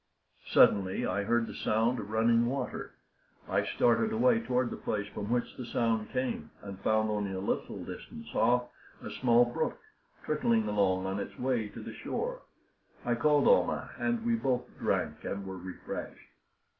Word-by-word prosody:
Suddenly 95 -2 +4
I 95 +2 0
heard 120 +1 +2
the - - -8
sound 115 +3 +1
of 105 - -6
running 115 +2 +3
water. 130 0 -4 0.5
I - - +1
started 120 - +2
away 235 +1 +4
toward 125 - 0
the - - -3
place 105 -1 -2
from 105 0 -5
which 120 0 0
the 125 - -5
sound 115 -3 0
came, 125 -12 -2
and 100 -1 -7
found, 110 +2 +2
only 105 -2 -1
a 95 - -3
little 95 - -3
distance - - -9
off, 125 +2 +2 0.3
a - - -6
small 120 -1 +4
brook 155 - -2 0.5
trickling 230 -2 +2
along 95 -2 +2
on 95 +1 -2
its 100 - -6
way 125 -4 0
to - - -10
the - - -7
shore. - - -4 0.6
I 120 - +2
called 145 +5 +3
Almah, - - +3
and 235 -2 0
we 235 - +2
both 130 - +1 0.2
drank - - -1
and 100 0 -4
were 95 0 -6
refreshed. 95 +1 -7
115 Hz, 170 wpm, -31 LUFS, 105-130 Hz, 0.6 s, Suddenly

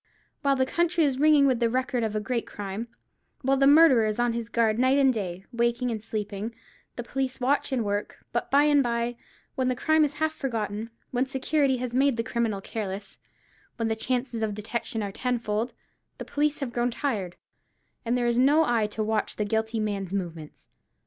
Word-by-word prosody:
While 280 -2 +3
the 260 -1 +2
country 340 +3 +1
is 270 -3 +1
ringing 300 -1 +6
with 260 -3 +2
the 235 -1 +2
record 255 0 0
of 215 -1 -2
a - - +1
great 235 +2 -2
crime—while 230 +6 -5
the 275 0 +4
murderer 285 -7 +7
is 215 - -2
on 240 -1 +1
his 230 -1 -4
guard 230 -2 +2
night 260 +2 +4
and 270 -2 +4
day, 190 -4 -4
waking 235 +1 +1
and 220 -2 -3
sleeping—the 215 +2 -7
police 260 +2 -3
watch 275 +3 +1
and 245 -4 0
work: 205 0 -2 0.2
but 240 - -1
by 280 +1 +5
and 295 -1 +5
by, 235 -1 -1 0.4
when 260 -3 -1
the 255 - +1
crime 315 +4 +3
is 295 -1 0
half 315 +1 0
forgotten—when 230 0 -3
security 270 0 +1
has 250 -1 -4
made 270 -1 +3
the 230 - 0
criminal 230 -4 -1
careless—when 210 +2 -7
the 220 - 0
chances 245 0 -2
of 215 -2 -1
detection 225 +1 -3
are 200 - -3
ten 250 +4 -1
fold—the 225 +1 -6
police 295 0 0
have 250 -4 -3
grown 240 0 +1
tired, 220 -9 -2 0.7
and 240 +1 0
there 245 - 0
is 240 0 +2
no 295 +5 +5
eye 230 -5 +2
to 215 +1 -3
watch 215 0 -1
the 210 - -1
guilty 220 +2 -1
man's 200 -3 -2
movements. 165 -5 -6
235 Hz, 190 wpm, -26 LUFS, 220-265 Hz, 0.7 s, murderer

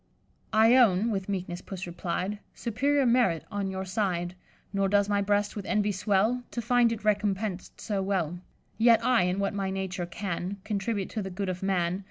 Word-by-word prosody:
"'I 225 +3 +6
own' 225 -2 +4
(with 195 -1 -3
meekness 180 -2 -3
Puss 190 -1 -6
replied) 180 +3 -3 0.2
'Superior 270 +5 +1
merit 235 -10 +3
on 200 -2 -2
your 190 0 -4
side; 185 -3 -1 0.4
Nor 195 -1 +1
does 205 0 +3
my 205 -1 +1
breast 205 +1 +1
with 205 - -4
envy 210 -1 +1
swell 205 +5 +1
To - - -4
find 235 0 +3
it 225 -2 -4
recompens'd 205 -2 -1
so 205 -3 -2
well. 180 -4 -1 0.4
Yet 230 0 +5
I, 250 -4 +4
in 180 +1 0
what 200 +1 0
my 195 -1 -2
nature 190 -2 -3
can, 180 +1 -4
Contribute 205 -1 -2
to 220 - -2
the 190 - -4
good 190 +1 -3
of 180 0 -4
man. 185 -2 0
200 Hz, 185 wpm, -28 LUFS, 185-215 Hz, 0.4 s, I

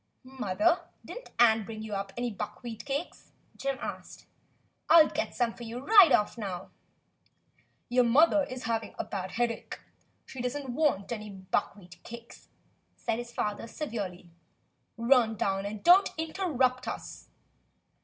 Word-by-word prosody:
"Mother, 265 - +1 0.3
did - - -7
n't - - -17
Ann 225 -2 +5
bring 220 +1 -7
you 220 -1 -6
up 195 0 -3
any 240 0 -1
buck 205 - -7
wheat 230 -3 -7
cakes 280 +4 -5 0.2
.^" - - -22
Jim 275 -1 -1
asked. - - -7 0.6
"I'll 325 -2 +8
get 320 +1 -3
some 240 -2 +1
for - - -15
you 235 0 -6
right 380 - +7
off 210 +3 +2
now." 190 -4 -5 1.2
"Your 250 0 +3
mother 295 +5 +5
is 255 0 -7
having 225 -1 -2
a - - -2
bad 185 -2 -5
headache. 235 -1 -2 0.5
She 260 - -8
does 250 +3 -2
n't 280 -2 -7
want 245 -8 0
any 215 -2 -5
buckwheat 185 -2 -4
cakes," 235 0 -12 0.5
said 230 -1 -2
his 240 0 -7
father. 210 0 -3 1.3
"Run 230 -1 +3
down 195 -1 -1
and 210 0 -7
don't 365 +3 +7
interrupt 280 -7 0
us." - - -7
240 Hz, 150 wpm, -29 LUFS, 215-275 Hz, 1.3 s, I'll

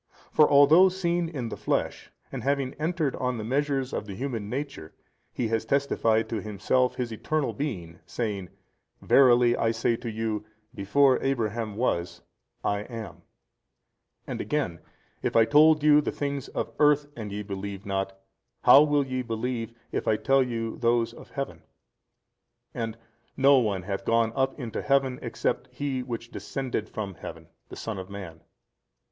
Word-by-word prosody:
For 150 - +5
although 150 +6 +7
seen 175 -2 -1
in 130 -8 -4
the - - -5
flesh - - -2 0.2
and 135 - -5
having 135 0 0
entered 160 -3 0
on 125 -1 -1
the 110 - -4
measures 135 +2 -1
of 105 - -3
the 100 - -6
human 115 -3 -4
nature, 135 - -5 0.4
He 115 - -2
has 115 0 0
testified 115 -3 +1
to 110 -3 -2
Himself 110 +5 0
His 125 -2 -3
Eternal 150 +6 -1
Being 90 - -5
saying, 100 -6 -3 0.5
Verily 120 -3 +5
I 115 - +1
say 115 +1 +1
to 120 - -6
you, 110 -1 -2 0.3
Before 130 +7 +3
Abraham 115 -5 -1
was 90 -8 -1 0.4
I 100 - 0
am, 110 0 -8 1.0
and - - -4
again, 140 - -2 0.4
If - - -2
I 115 -1 +6
told 155 +3 +5
you 150 0 +6
the - - -2
things 140 -2 -3
of - - -4
earth 150 -1 +4
and 110 -3 -6
ye 105 +1 -4
believe 100 0 -6
not, 95 -1 -3 0.4
how 140 - +9
will 145 -2 +3
ye 130 -1 -2
believe 115 0 -3 0.2
if - - -3
I 110 - +4
tell 135 +5 +3
you 115 -3 -2
those 115 -1 +1
of - - -13
Heaven? - - -5 1.1
and 115 -1 -4 0.4
no 135 0 +6
one 100 -6 -1
hath 100 +1 -4
gone 115 -1 +2
up 135 +2 0
into 120 -4 -4
Heaven 135 -2 +1
except 125 +1 -2
He 135 0 -2
which 120 -1 -6
descended 130 -5 -4
from 100 -3 -5
heaven, 85 - -10 0.2
the - - -9
Son 110 -4 -5
of 95 0 -8
man. 95 -5 -8
120 Hz, 160 wpm, -27 LUFS, 110-140 Hz, 1.1 s, how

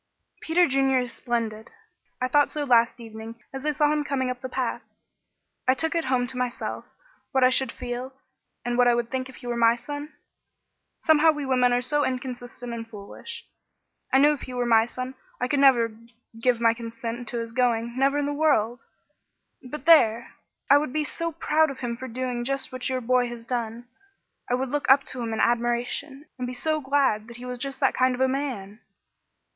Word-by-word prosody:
"Peter 345 +2 +3
Junior 270 -1 +2
is 245 -1 -3
splendid. 225 -2 -3 0.5
I 255 - 0
thought 290 +2 +3
so 300 - -3
last 235 -3 +3
evening 225 0 -9
as 270 +2 -4
I - - +3
saw 295 0 +2
him 300 -1 0
coming 260 -3 -1
up 250 0 -7
the 260 - -5
path. - - -2 0.9
I 260 - +5
took 320 +5 -1
it 335 -1 0
home 255 -1 +1
to 250 +1 -4
myself 250 -1 -3 0.5
what 265 -1 +3
I 255 - +6
should 260 -2 +2
feel, 245 +1 -5 0.5
and 240 0 -1
what 245 - +6
I 240 - +5
would 235 -1 -2
think 260 0 -2
if 260 - -12
he - - -13
were 240 0 -2
my 230 0 +4
son. 290 +5 -7 0.9
Somehow 315 0 +4
we 295 -2 0
women 250 -2 +3
are 245 0 +2
so 295 +3 +2
inconsistent 245 -2 -4
and 230 -1 -6
foolish. 220 - -9 0.7
I 265 - +5
knew 295 +2 +6
if 290 - -7
he 255 - -7
were 245 -1 0
my 225 -1 +4
son, 255 +1 -6 0.3
I 250 - 0
never 265 -5 +5
could 230 +1 -18 0.3
give 245 -1 +2
my 230 -1 +4
consent 230 +1 -6
to 240 - -3
his 230 -1 -4
going, 235 -1 0
never 275 +2 +2
in 290 - 0
the 290 - -1
world, 275 -6 +2 0.8
but 280 +4 -8
there! 235 -9 +5 0.3
I 285 +1 +7
would 290 -3 -4
be 305 0 +1
so 335 +3 -3
proud 315 0 +2
of 275 - -8
him 240 -2 -2
for 260 +2 -7
doing 250 0 -3
just 275 +3 -2
what 255 0 -3
your 255 -1 -1
boy 250 +1 +2
has 235 -1 -8
done; 235 -1 -4 0.6
I 245 - +3
would 260 +1 -2
look 290 0 -2
up 275 +1 +7
to 255 - -5
him 230 -1 -3
in 220 - -2
admiration, 240 +5 0
and 250 - -2
be 250 - -5
so 310 +4 -1
glad 265 -6 +1
that 235 0 -11
he 245 - -9
was 250 -1 -5
just 275 +1 -4
that 270 - +3
kind 255 0 +2
of 250 - -5
a 265 - +5
man!" 250 -7 -3
250 Hz, 210 wpm, -25 LUFS, 235-275 Hz, 0.9 s, I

